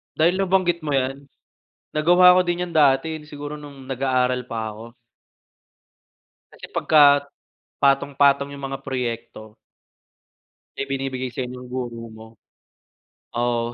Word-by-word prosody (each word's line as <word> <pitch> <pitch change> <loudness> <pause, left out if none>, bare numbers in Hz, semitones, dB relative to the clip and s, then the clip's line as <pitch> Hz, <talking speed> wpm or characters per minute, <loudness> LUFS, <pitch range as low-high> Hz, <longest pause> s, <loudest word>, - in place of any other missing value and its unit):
Dahil 170 +4 +3
nabanggit 185 -3 +1
mo 145 - -1
'yan, 135 +1 -1 0.7
nagawa 175 +4 +6
ko - - +5
din 175 0 0
'yan 180 - -6
dati, 155 +1 +3
eh, 150 - -15
siguro 145 0 -7
nung 140 -2 -12
nag-aaral 130 -1 0
pa 110 -2 -4
ako. 105 +1 -11 1.7
Kasi - - -11
pagka 155 -2 +5 0.8
patong-patong 140 0 +3
yung 140 -1 -7
mga 135 - -5
proyekto 115 -4 -5 1.2
na - - -8
ibinibigay 135 -1 -3
sayo 125 +1 -4
ng 125 0 -10
guro 120 -2 -5
mo 110 0 -12 1.1
oo. 120 0 -1
135 Hz, 120 wpm, -22 LUFS, 125-150 Hz, 1.7 s, nagawa